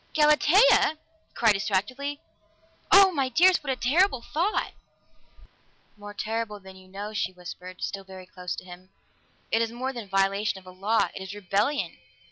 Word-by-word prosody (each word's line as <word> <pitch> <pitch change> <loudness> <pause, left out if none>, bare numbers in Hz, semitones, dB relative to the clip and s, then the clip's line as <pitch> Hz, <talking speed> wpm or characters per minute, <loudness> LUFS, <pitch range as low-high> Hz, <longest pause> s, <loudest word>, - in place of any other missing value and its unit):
"Galatea!" 310 +4 +5 0.3
he - - -39
cried 225 -2 +4
distractedly. 215 +9 -2 0.7
"Oh, 395 -1 +8
my 275 -6 -1
dearest 345 +4 +4
what 275 - -2
a - - 0
terrible 265 +2 +2
thought!" 345 - -1 1.2
"More 205 0 -11
terrible 220 -1 -3
than 190 -1 -13
you 185 0 -16
know," 200 +3 -7
she 185 -3 -1
whispered, 180 0 -10
still 195 -1 -4
very 190 -1 -11
close 180 -1 -6
to - - -9
him. 180 +1 -13 0.6
"It 225 - +2
is 230 -1 -1
more 255 +3 -4
than 230 -5 -8
violation 195 +1 +1
of 190 - -14
a 185 - -11
law; 200 +5 0
it - - -8
is 190 +1 -7
rebellion! 205 - -1
210 Hz, 165 wpm, -26 LUFS, 190-275 Hz, 1.2 s, Oh